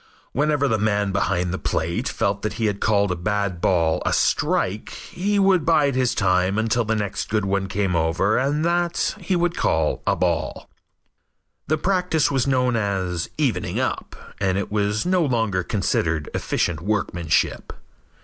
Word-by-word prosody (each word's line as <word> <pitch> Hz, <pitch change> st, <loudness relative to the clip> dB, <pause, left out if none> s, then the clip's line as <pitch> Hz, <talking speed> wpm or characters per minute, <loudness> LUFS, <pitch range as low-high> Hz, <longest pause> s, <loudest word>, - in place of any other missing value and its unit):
Whenever 145 Hz, +1 st, +1 dB
the 110 Hz, -4 st, +1 dB
man 105 Hz, -1 st, +1 dB
behind 90 Hz, -2 st, 0 dB
the 95 Hz, -, -3 dB
plate 85 Hz, +10 st, -1 dB
felt 100 Hz, -2 st, -1 dB
that 105 Hz, -, -2 dB
he 115 Hz, -, -2 dB
had 100 Hz, -1 st, -1 dB
called 100 Hz, -3 st, +2 dB
a -, -, 0 dB
bad 95 Hz, 0 st, -2 dB
ball 85 Hz, -3 st, +2 dB
a -, -, 0 dB
strike, 100 Hz, +4 st, 0 dB
he 205 Hz, +3 st, -3 dB
would 190 Hz, -4 st, +4 dB
bide 150 Hz, -3 st, +3 dB
his 130 Hz, -1 st, +1 dB
time 95 Hz, 0 st, +2 dB
until 115 Hz, +2 st, +1 dB
the 110 Hz, 0 st, -1 dB
next 105 Hz, -2 st, -3 dB
good 105 Hz, -1 st, 0 dB
one 100 Hz, 0 st, 0 dB
came 95 Hz, -2 st, -1 dB
over 85 Hz, +6 st, +1 dB
and 145 Hz, +4 st, 0 dB
that 175 Hz, 0 st, 0 dB
he 185 Hz, 0 st, -1 dB
would 175 Hz, 0 st, 0 dB
call 80 Hz, -1 st, 0 dB
a -, -, +3 dB
ball. -, -, -1 dB, 1.0 s
The 155 Hz, -, +1 dB
practice 180 Hz, -3 st, +1 dB
was 135 Hz, -2 st, +1 dB
known 125 Hz, -2 st, +2 dB
as 95 Hz, -5 st, -1 dB
"evening -, -, 0 dB
up" -, -, -3 dB, 0.2 s
and 95 Hz, -1 st, +1 dB
it 100 Hz, -, -2 dB
is 105 Hz, +3 st, 0 dB
no 180 Hz, -1 st, +2 dB
longer 115 Hz, -9 st, 0 dB
considered 85 Hz, -5 st, -1 dB
efficient 80 Hz, -3 st, -1 dB
workmanship. 90 Hz, -5 st, -1 dB
105 Hz, 165 wpm, -22 LUFS, 95-140 Hz, 1.0 s, would